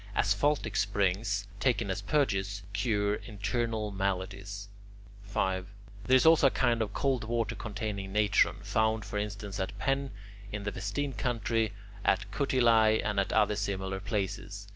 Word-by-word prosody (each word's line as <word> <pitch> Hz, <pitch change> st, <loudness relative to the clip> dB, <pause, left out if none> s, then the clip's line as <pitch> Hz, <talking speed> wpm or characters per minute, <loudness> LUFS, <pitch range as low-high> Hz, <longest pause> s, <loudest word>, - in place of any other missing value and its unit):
Asphaltic 110 Hz, +3 st, +1 dB
springs, 100 Hz, 0 st, 0 dB
taken 115 Hz, -6 st, +1 dB
as 95 Hz, +2 st, -3 dB
purges, 100 Hz, -6 st, 0 dB
cure 105 Hz, 0 st, +1 dB
internal 110 Hz, 0 st, -2 dB
maladies. 100 Hz, +1 st, -3 dB, 0.6 s
5. 95 Hz, -2 st, -1 dB, 0.4 s
There 130 Hz, -, +5 dB
is 130 Hz, -, +5 dB
also 160 Hz, -3 st, +7 dB
a -, -, +5 dB
kind 120 Hz, -3 st, +1 dB
of 110 Hz, -, -1 dB
cold 135 Hz, -4 st, 0 dB
water 115 Hz, 0 st, -1 dB
containing 105 Hz, -3 st, -4 dB
natron, 105 Hz, 0 st, +3 dB
found 110 Hz, -1 st, +1 dB
for 105 Hz, -, -3 dB
instance 100 Hz, -1 st, -4 dB
at 95 Hz, -, -3 dB
Penne 135 Hz, 0 st, 0 dB, 0.4 s
in 105 Hz, -1 st, -4 dB
the 105 Hz, -, -2 dB
Vestine 105 Hz, +10 st, -3 dB
country, 115 Hz, -3 st, 0 dB, 0.3 s
at 100 Hz, +1 st, +1 dB
Cutiliae, 115 Hz, -5 st, +3 dB
and 105 Hz, -2 st, 0 dB
at 100 Hz, -, 0 dB
other 105 Hz, -1 st, +3 dB
similar 95 Hz, -2 st, -2 dB
places. 100 Hz, 0 st, -3 dB
105 Hz, 140 wpm, -30 LUFS, 100-115 Hz, 0.6 s, also